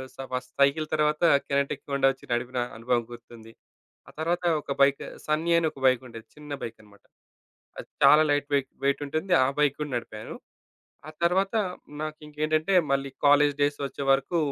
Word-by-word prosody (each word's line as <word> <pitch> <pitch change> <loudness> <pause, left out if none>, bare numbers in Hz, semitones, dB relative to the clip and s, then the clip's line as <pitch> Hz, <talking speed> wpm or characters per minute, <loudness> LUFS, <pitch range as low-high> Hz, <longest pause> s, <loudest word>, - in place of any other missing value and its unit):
స - - -31 0.2
first 125 0 -4
cycle 150 +3 +3
తరువాత 150 +1 +1 0.3
kinetic 140 0 -1
Honda 135 -1 +3
ఒచ్చి 135 - -18
నడిపిన 120 +1 -2 0.2
అనుభవం 120 +1 0
గుర్తుంది. 115 -1 -13 0.6
ఆ - - -13
తరువాత 175 +2 -1 0.2
ఒక 140 - -4
బైక్ 140 0 +3 0.2
సన్నీ 155 +3 0
అని 160 - 0
ఒక 135 - -14
బైకుండేది. 120 -3 -1
చిన్న 150 -1 -11
బైకనమాట. 105 -3 -10 0.8
అది - - -8 0.2
చాలా 150 +1 +8
లైట్ 145 0 0
వెయి 140 - +2 0.2
వెయిటుంటుంది. 145 +6 -1
ఆ - - 0
బైక్ 145 -2 +3
కూడా 150 -2 -3
నడిపాను. 110 -2 -7 0.7
ఆ - - -8
తరువాత 190 +5 +1 0.5
నాకింకేంటంటే, 155 +3 -2 0.2
మళ్ళీ 140 0 0 0.2
కాలేజ్ 145 0 +5
డేస్ 145 0 +1
వచ్చేవరకు 135 +4 0
140 Hz, 150 wpm, -26 LUFS, 125-155 Hz, 0.8 s, చాలా